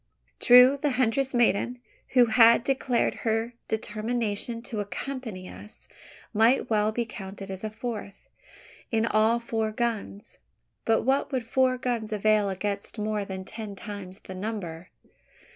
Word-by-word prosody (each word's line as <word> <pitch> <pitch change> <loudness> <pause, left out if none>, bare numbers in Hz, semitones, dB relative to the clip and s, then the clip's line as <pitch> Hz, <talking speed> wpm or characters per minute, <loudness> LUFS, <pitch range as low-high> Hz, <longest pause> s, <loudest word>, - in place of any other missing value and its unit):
True, 250 +3 +7
the 290 -3 +1
huntress 260 +2 +1
maiden, 240 0 +2 0.4
who 245 - +8
had 230 0 +6
declared 260 -2 +1
her 225 +1 -1
determination 225 +1 -2
to 230 -3 -5
accompany 205 -1 -5
us, 210 - -12 0.5
might 230 +3 +3
well 215 0 +2
be 235 +2 -1
counted 195 -3 -8
as 190 +1 -7
a 215 - -2
fourth; 215 -2 -7 0.6
in 225 -1 +1
all 220 +1 +3
four 225 -2 -2
guns. 215 -3 -4 0.5
But 225 -1 +2
what 270 +3 +1
would 255 -4 -2
four 255 +1 +2
guns 240 -3 -2
avail 210 -1 +2
against 200 +3 -3
more 210 -1 -1
than 190 -1 -6
ten 215 -1 -7
times 195 -2 -8
the 190 - -8
number? 185 -4 -5
220 Hz, 140 wpm, -27 LUFS, 205-240 Hz, 0.6 s, who